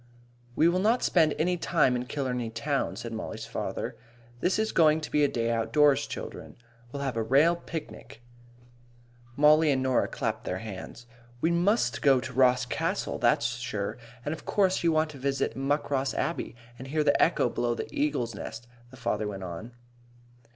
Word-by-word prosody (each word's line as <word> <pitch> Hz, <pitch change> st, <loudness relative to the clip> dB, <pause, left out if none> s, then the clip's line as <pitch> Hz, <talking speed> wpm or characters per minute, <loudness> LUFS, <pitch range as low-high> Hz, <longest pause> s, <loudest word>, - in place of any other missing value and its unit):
"We 160 Hz, -, +4 dB
will 175 Hz, +2 st, +2 dB
not 225 Hz, +6 st, +2 dB
spend 160 Hz, -4 st, +3 dB
any 180 Hz, +3 st, +1 dB
time 150 Hz, -6 st, +2 dB
in 125 Hz, 0 st, -3 dB
Killarney 125 Hz, -5 st, -2 dB
town," 135 Hz, +5 st, -2 dB
said 115 Hz, -1 st, -6 dB
Mollie's 110 Hz, -, -5 dB
father. -, -, -4 dB, 0.4 s
"This 180 Hz, -, +1 dB
is 220 Hz, 0 st, 0 dB
going 155 Hz, -2 st, +4 dB
to 155 Hz, -, -7 dB
be 150 Hz, -, +3 dB
a -, -, +5 dB
day 115 Hz, -3 st, -1 dB
outdoors, 140 Hz, +5 st, +3 dB
childer. -, -, -7 dB, 0.4 s
We'll 140 Hz, 0 st, -4 dB
have 135 Hz, -3 st, -2 dB
a -, -, +1 dB
rale 140 Hz, +9 st, +4 dB
picnic." 160 Hz, -8 st, -8 dB, 1.1 s
Mollie 150 Hz, +2 st, +5 dB
and 130 Hz, -1 st, +1 dB
Norah 130 Hz, -1 st, +2 dB
clapped -, -, -3 dB
their 90 Hz, -, -3 dB
hands. 110 Hz, +3 st, -8 dB, 0.3 s
"We 165 Hz, +6 st, +1 dB
must 190 Hz, +7 st, +1 dB
go 135 Hz, -3 st, +5 dB
to 130 Hz, +1 st, -7 dB
Ross 125 Hz, 0 st, +4 dB
Castle, 125 Hz, -, -2 dB
that's 115 Hz, +1 st, +2 dB
sure. 115 Hz, -3 st, -4 dB, 0.3 s
And 150 Hz, -, -1 dB
of 160 Hz, -, -9 dB
course 190 Hz, -3 st, +1 dB
you 170 Hz, -, +4 dB
want 155 Hz, 0 st, +1 dB
to 140 Hz, -, -11 dB
visit 135 Hz, -3 st, -1 dB
Muckross 135 Hz, 0 st, -1 dB
Abbey -, -, -2 dB, 0.2 s
and 130 Hz, -, -8 dB
hear 155 Hz, +2 st, 0 dB
the -, -, +3 dB
echo -, -, +3 dB
below 120 Hz, -1 st, -1 dB
the -, -, -4 dB
Eagle's 285 Hz, -, 0 dB
Nest," 110 Hz, +3 st, -7 dB, 0.2 s
the 130 Hz, -, -14 dB
farmer 110 Hz, -4 st, -1 dB
went 95 Hz, -2 st, -6 dB
on. 90 Hz, +6 st, -7 dB
135 Hz, 180 wpm, -28 LUFS, 120-155 Hz, 1.1 s, a